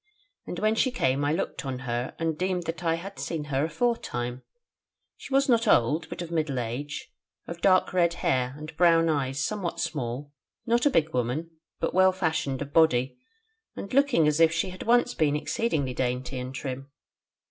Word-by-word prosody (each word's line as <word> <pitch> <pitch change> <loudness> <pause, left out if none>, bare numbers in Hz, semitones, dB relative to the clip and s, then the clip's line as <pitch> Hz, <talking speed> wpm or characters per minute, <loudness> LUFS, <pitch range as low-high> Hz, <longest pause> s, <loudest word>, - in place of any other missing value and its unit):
And 175 - -5
when 215 +3 +2
she 240 +4 +2
came 140 - 0
I 145 - +1
looked 165 +1 -2
on 135 -2 -3
her, 120 +1 -3
and 165 -1 -1
deemed 180 +1 -1
that 165 +1 -5
I 165 -1 +2
had 195 +4 -8
seen 165 -3 -3
her 135 +3 +2
aforetime: 150 - -2 0.7
she - - -12
was 275 +1 +3
not 235 -2 +3
old, 155 - +3
but - - -5
of 170 - -9
middle 155 -5 -1
age, 125 +5 -4 0.3
of 170 0 -8
dark 185 -1 +3
red 170 -2 +2
hair, 130 -4 0
and 155 +1 -9
brown 165 -1 +5
eyes 140 -2 0
somewhat 200 -5 -3
small: 140 -1 -3 0.3
not 240 +3 +3
a - - +5
big 160 - +1
woman, 125 +7 -1 0.3
but - - -1
well 185 0 +5
fashioned 160 -7 -1
of 140 - -12
body, 135 - +3 0.6
and 200 - -7
looking 270 - +4
as 150 +1 +2
if 165 -1 +6
she 170 +2 -1
had 185 - -10
once 240 +1 +3
been 150 -3 +1
exceeding 155 -1 -1
dainty 125 +1 -2
and 130 +1 -6
trim. 135 +1 -5
160 Hz, 185 wpm, -27 LUFS, 135-185 Hz, 0.7 s, if